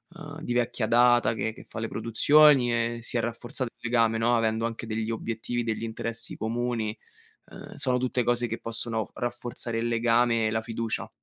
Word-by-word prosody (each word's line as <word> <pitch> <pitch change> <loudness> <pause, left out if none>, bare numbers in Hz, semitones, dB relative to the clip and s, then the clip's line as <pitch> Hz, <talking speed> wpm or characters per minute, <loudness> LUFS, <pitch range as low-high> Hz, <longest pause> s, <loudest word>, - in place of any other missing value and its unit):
uhm, 160 -2 -9
di 120 - -3
vecchia 120 -1 0
data 120 0 +4
che 110 0 -2
che 115 - -13
fa 110 - -8
le 115 - -2
produzioni 130 +3 +4
e 115 0 -1
si 125 - -3
è - - +2
rafforzato 120 +2 -3
il - - -50
legame, 115 -2 +3
no, 120 +2 +3
avendo 115 0 +1
anche 115 0 -4
degli 110 0 -2
obiettivi, 115 +1 -3
degli 115 -1 -3
interessi 115 0 -4
comuni, 115 -1 -2 0.5
uhm, - - -10
sono 125 -1 +3
tutte 125 0 0
cose 120 0 +1
che 115 0 -4
possono 115 -2 -1
rafforzare 120 -1 -3
il 115 - -1
legame 115 -1 +2
e - - -1
la 110 0 0
fiducia. 115 0 -3
115 Hz, 185 wpm, -27 LUFS, 115-120 Hz, 0.5 s, data